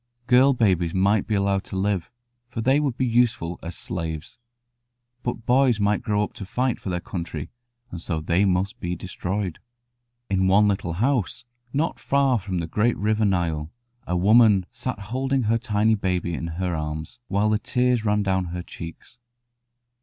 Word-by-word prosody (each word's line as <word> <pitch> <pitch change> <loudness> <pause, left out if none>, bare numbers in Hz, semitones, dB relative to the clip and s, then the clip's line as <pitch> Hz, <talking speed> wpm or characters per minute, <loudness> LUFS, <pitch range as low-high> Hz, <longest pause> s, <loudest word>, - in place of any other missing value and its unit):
Girl 130 +3 +5
babies 95 -8 +1
might 100 +2 +2
be 110 - 0
allowed 100 -1 +1
to - - -7
live, 95 -2 0 0.4
for 120 - -6
they 130 +5 +3
would 140 -5 -1
be 130 - +1
useful 115 -8 +1
as 85 0 -6
slaves, 80 +2 -5 0.8
but 120 -2 -4
boys 125 -3 +4
might 105 0 +2
grow 105 -2 +1
up - - -5
to - - -8
fight 125 +3 0
for - - -5
their 90 -1 -1
country, 85 -4 -5 0.4
and 85 - -6
so 80 -2 -2
they 85 +5 +1
must 100 +5 0
be 90 -3 -3
destroyed. 95 +1 -4 0.7
In 95 -1 +1
one 100 +2 +5
little 95 -4 -1
house, 120 +3 0 0.3
not 150 +5 -1
far 135 -3 +2
from 95 -1 -4
the 85 - -1
great 110 +7 +1
river 110 +1 +1
Nile, 85 -6 0 0.4
a 90 - 0
woman 105 0 +5
sat 130 -3 -4
holding 130 +6 -1
her 115 +1 +2
tiny 110 -1 +2
baby 90 -4 -1
in 85 - -3
her 90 -2 -1
arms, 75 +5 -5
while 105 +2 +1
the 105 - +2
tears 125 -1 +1
ran 105 -1 +2
down 95 -1 +1
her 90 +1 -5
cheeks. 85 +8 -10
100 Hz, 175 wpm, -24 LUFS, 90-120 Hz, 0.8 s, Girl